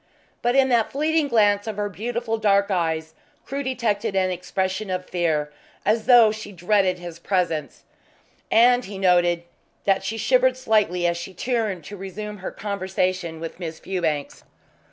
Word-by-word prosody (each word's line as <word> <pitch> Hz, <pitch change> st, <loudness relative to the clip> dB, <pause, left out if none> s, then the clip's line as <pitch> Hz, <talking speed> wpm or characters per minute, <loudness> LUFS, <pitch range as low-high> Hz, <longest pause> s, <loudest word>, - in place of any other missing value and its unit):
But 240 Hz, +1 st, +1 dB
in 270 Hz, -1 st, +4 dB
that 235 Hz, -3 st, +2 dB
fleeting 310 Hz, +2 st, +1 dB
glance 205 Hz, -4 st, +3 dB
of 215 Hz, -2 st, -4 dB
her 205 Hz, 0 st, -1 dB
beautiful 225 Hz, +2 st, -3 dB
dark 200 Hz, -1 st, +3 dB
eyes 160 Hz, -3 st, -1 dB, 0.3 s
Crewe 275 Hz, +1 st, -3 dB
detected 225 Hz, -6 st, -1 dB
an 185 Hz, -1 st, +2 dB
expression 190 Hz, +3 st, -2 dB
of 185 Hz, 0 st, -3 dB
fear, 155 Hz, -4 st, -1 dB, 0.3 s
as 215 Hz, +2 st, +1 dB
though 235 Hz, -4 st, +7 dB
she 215 Hz, -1 st, -7 dB
dreaded 185 Hz, 0 st, +1 dB
his 175 Hz, -2 st, -9 dB
presence, 170 Hz, -6 st, -1 dB, 0.7 s
and 245 Hz, +2 st, +5 dB
he 195 Hz, 0 st, -7 dB
noticed 175 Hz, -2 st, +3 dB, 0.4 s
that 195 Hz, -1 st, +2 dB
she 215 Hz, +4 st, -3 dB
shivered 255 Hz, +2 st, +3 dB
slightly 210 Hz, -8 st, +1 dB
as 170 Hz, 0 st, +1 dB
she 175 Hz, +2 st, -8 dB
turned 220 Hz, -5 st, -1 dB
to 205 Hz, +6 st, -9 dB
resume 210 Hz, +2 st, -6 dB
her 190 Hz, -, -5 dB
conversation 185 Hz, -4 st, -2 dB
with 165 Hz, +2 st, -7 dB
Miss 165 Hz, -3 st, -5 dB
Fewbanks. 160 Hz, -6 st, -3 dB
195 Hz, 155 wpm, -23 LUFS, 180-225 Hz, 0.7 s, though